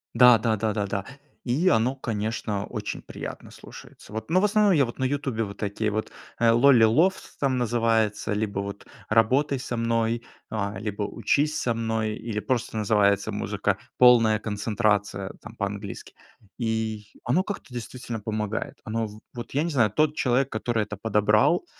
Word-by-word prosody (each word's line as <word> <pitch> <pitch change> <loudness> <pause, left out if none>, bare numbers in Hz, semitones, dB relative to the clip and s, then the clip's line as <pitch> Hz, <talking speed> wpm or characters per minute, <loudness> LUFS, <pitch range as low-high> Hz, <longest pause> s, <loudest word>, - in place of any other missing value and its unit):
Да 125 -2 +8
да 110 0 +1
да 110 0 -1
да 105 -2 -1
да. 100 0 -3 0.4
И 150 +10 +1
оно, 120 +4 +2
конечно, 110 -4 -3
очень - - -5
приятно - - -8
слушается. - - -13
Вот. 110 +8 -5
Но 185 - +5
в - - +4
основном 210 -2 +4
я 140 -4 +4
вот 120 - -8
на 130 - -2
"Ютубе" 130 -4 -1
вот 100 -1 -7
такие 105 +1 -2
вот, 110 +1 -2 0.3
э, 115 - +2
lolly 120 -1 +6
love 165 +12 +4 0.3
там 130 -3 +1
называется, 115 -3 +1
либо 105 -2 -2
вот 100 0 -7 0.2
"работай 130 +5 +3
со 125 -2 -4
мной", 115 0 0 0.3
а, 100 -2 -3
либо 105 -1 -3
"учись 145 +9 0
со 120 - 0
мной", 110 -1 -1
или 110 -2 -4
просто 110 +1 -2
называется 100 -2 +2
"музыка - - -1 0.2
полная 115 -4 +6
концентрация" 105 -2 -1
там - - -11
по-английски. 100 0 -5 0.4
И 110 -2 -2 0.2
оно 165 +10 +2
как-то 200 -11 -7
действительно 120 -1 -6
помогает. 105 0 -3
Оно 115 +1 -2
в 105 +1 -12
вот 120 -1 -7
я 145 - +2
не 170 - -1
знаю, 115 -9 +2
тот 155 +5 +2
человек, 130 0 +1
который 110 +1 -1
это 105 -1 -7
подобрал, 105 - +2
115 Hz, 170 wpm, -25 LUFS, 105-125 Hz, 0.4 s, Да